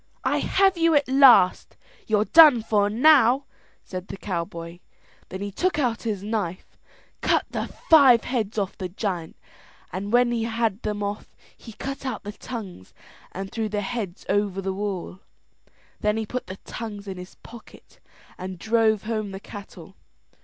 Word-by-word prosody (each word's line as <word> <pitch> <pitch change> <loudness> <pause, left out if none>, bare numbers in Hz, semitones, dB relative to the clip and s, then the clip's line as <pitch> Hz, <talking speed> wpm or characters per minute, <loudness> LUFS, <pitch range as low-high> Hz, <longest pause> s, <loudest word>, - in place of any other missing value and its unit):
"I - - +1
have 385 -2 +2
you 330 -1 +4
at 290 -1 +3
last; 260 -8 +5 0.3
you're 215 -1 +2
done 300 -7 +7
for 205 -2 +2
now!", 260 +2 +5 0.4
said 185 0 -7
the - - -7
cowboy. 170 -2 -5 0.5
Then 190 - -7
he 200 0 -4
took 360 - -1
out 245 -6 0
his 210 -4 -3
knife, 205 -5 -4 0.5
cut - - +2
the - - -3 0.2
five 270 -7 +7
heads 225 -4 -3
off 200 -2 -2
the 185 -2 -5
giant, 180 -3 -4 0.6
and 195 +3 -4
when 245 0 +4
he 230 -1 -1
had 225 -2 -1
them 210 -1 -3
off 205 +1 -5 0.2
he 225 - -12
cut 275 +5 -6
out 260 - -4
the 205 - -6
tongues 205 - -9 0.4
and 195 +1 -6
threw 220 -2 -2
the 210 0 -2
heads 205 -4 -5
over 200 -1 0
the 190 0 -2
wall. 190 -2 -4 0.8
Then 210 +1 0
he 220 - -2
put 250 +4 -5
the 185 +1 -7
tongues 210 -3 -7
in 190 -1 -6
his 180 +1 -10
pocket 235 -1 -15 0.4
and 185 0 -6
drove 220 +1 +1
home 215 -2 -3
the 195 0 -7
cattle. 195 -3 -11
210 Hz, 165 wpm, -24 LUFS, 195-235 Hz, 0.8 s, done